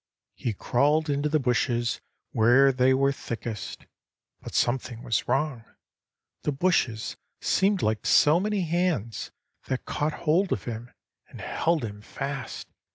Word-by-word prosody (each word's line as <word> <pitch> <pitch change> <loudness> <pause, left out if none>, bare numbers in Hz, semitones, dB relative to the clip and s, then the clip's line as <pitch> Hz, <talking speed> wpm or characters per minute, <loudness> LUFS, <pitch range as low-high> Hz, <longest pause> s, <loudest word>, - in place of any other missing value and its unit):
"He 115 - -3
crawled 145 +9 +2
into 145 +1 0
the 155 +1 +2
bushes 120 -2 0 0.3
where 125 +5 +5
they 130 0 +3
were 135 +1 +3
thickest. 115 -6 -6 0.6
But - - -8
something 120 -1 0
was 115 - 0
wrong; 135 -2 0 0.8
the 150 - 0
bushes 135 -8 0 0.2
seemed 195 0 +2
like 110 0 0
so 150 +3 +6
many 210 +1 0
hands, 170 - -1 0.4
that 130 -1 -2
caught 150 +1 -1
hold 175 +5 +3
of - - -1
him, 120 0 -6 0.4
and - - -12
held 165 -6 0
him 105 -1 -7
fast. 135 +2 -5
135 Hz, 135 wpm, -27 LUFS, 120-155 Hz, 0.8 s, so